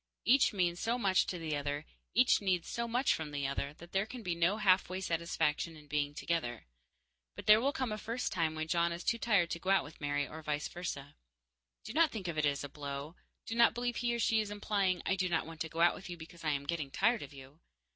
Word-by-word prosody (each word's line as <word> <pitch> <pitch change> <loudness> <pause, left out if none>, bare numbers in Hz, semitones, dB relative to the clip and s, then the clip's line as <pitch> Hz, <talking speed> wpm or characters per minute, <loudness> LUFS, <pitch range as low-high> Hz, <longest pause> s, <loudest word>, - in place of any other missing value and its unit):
Each 265 +3 +5
means 175 -3 0
so 230 +2 0
much 195 -6 +3
to 180 - -3
the 160 -3 -2
other, 145 +1 -3 0.3
each 250 0 +5
needs 185 -4 0
so 235 0 -2
much 245 +4 +2
from 160 -2 -4
the 145 -1 -3
other, 140 +1 -2
that 170 +2 -13
there 195 +2 +1
can 245 0 -8
be 180 -3 -1
no 170 +5 +2
halfway 185 -2 +3
satisfaction 165 -2 -1
in 150 - -14
being 145 0 -1
together. 120 -11 -2 0.7
But - - -8
there 215 +1 +7
will 275 +3 +2
come 260 -4 -2
a 215 - -3
first 230 +4 -3
time 165 -4 0
when 155 0 -3
John 170 +1 +2
is 170 +1 -5
too 230 +1 +1
tired 200 -8 +2
to 170 - -2
go 185 - -4
out 195 - +4
with 150 - -13
Mary, 145 0 0
or 160 - -8
vice 150 -1 -2
versa. 145 -5 -6 0.7
Do 220 - -7
not 325 +1 +5
think 210 -8 -5
of 170 - -3
it 155 -1 +2
as 140 0 -1
a - - -4
blow; 140 +2 -6 0.3
do - - -4
not 235 0 +5
believe 245 0 -1
he 240 0 0
or - - -1
she 225 -1 +3
is 210 - -4
implying 200 -3 0
"I 190 - +2
do 185 -1 0
not 160 -2 +1
want 165 0 -9
to 160 - -2
go 165 +1 -3
out 175 - +6
with 190 - -9
you 175 - -6
because 165 +1 -12
I 155 - +1
am 140 -1 -1
getting 155 -2 -2
tired 220 - +2
of - - -8
you." 135 +2 -13
170 Hz, 255 wpm, -33 LUFS, 150-215 Hz, 0.7 s, there